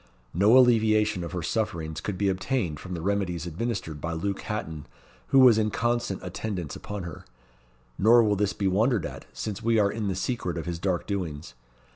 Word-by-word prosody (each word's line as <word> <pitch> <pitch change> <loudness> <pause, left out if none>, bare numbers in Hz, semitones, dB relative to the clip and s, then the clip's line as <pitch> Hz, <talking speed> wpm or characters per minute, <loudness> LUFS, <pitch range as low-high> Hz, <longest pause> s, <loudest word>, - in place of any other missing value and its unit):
No 105 +8 +5
alleviation 110 -5 +4
of 85 - -6
her 90 -2 -3
sufferings 85 -7 -2
could 100 -3 -4
be 100 - +1
obtained 95 - -1
from 90 +2 -6
the 80 - -5
remedies 95 -4 -1
administered 85 -4 -4
by 85 0 -3
Luke 100 +4 -2
Hatton, 80 -9 -5 0.4
who - - +3
was 125 -4 +7
in 110 -1 +1
constant 120 -2 -1
attendance 90 -3 -4
upon 100 -2 -6
her; 85 -2 -8 0.8
nor 115 +3 +6
will 105 -2 +2
this 100 0 0
be 100 - -1
wondered 110 +3 +2
at, - - -7
since 105 -3 -5
we 115 0 +2
are 100 -2 +3
in 110 -2 -3
the 95 - -1
secret 95 -3 -2
of 85 - -4
his 85 -1 -4
dark 90 -1 -1
doings. 80 -9 -4
100 Hz, 190 wpm, -27 LUFS, 85-110 Hz, 0.8 s, was